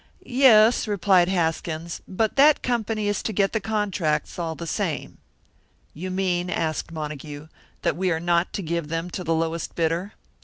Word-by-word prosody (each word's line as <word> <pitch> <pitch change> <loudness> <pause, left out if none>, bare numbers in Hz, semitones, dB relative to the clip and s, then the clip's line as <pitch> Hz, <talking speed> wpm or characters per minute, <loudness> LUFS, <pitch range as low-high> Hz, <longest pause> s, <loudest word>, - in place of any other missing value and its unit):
"Yes," 240 -3 +5
replied 190 -3 +3
Haskins, 165 -2 -2
"but 215 +3 -1
that 290 +2 +5
company 225 -3 -1
is 205 - 0
to - - -2
get 195 -1 +1
the 220 - +1
contracts, 195 -9 -1
all 165 -2 -2
the 170 - -7
same." 165 - -3 0.7
"You 180 +5 -6
mean," 185 -1 -1
asked 160 -2 -2
Montague, 150 -1 -7 0.3
"that - - +1
we 185 +2 0
are 160 -2 0
not 170 +1 +1
to 200 - -3
give 170 -1 -2
them 165 +3 -3
to 180 - -4
the 165 -1 0
lowest 165 0 -2
bidder?" 170 +4 -1
175 Hz, 165 wpm, -24 LUFS, 165-205 Hz, 0.7 s, Yes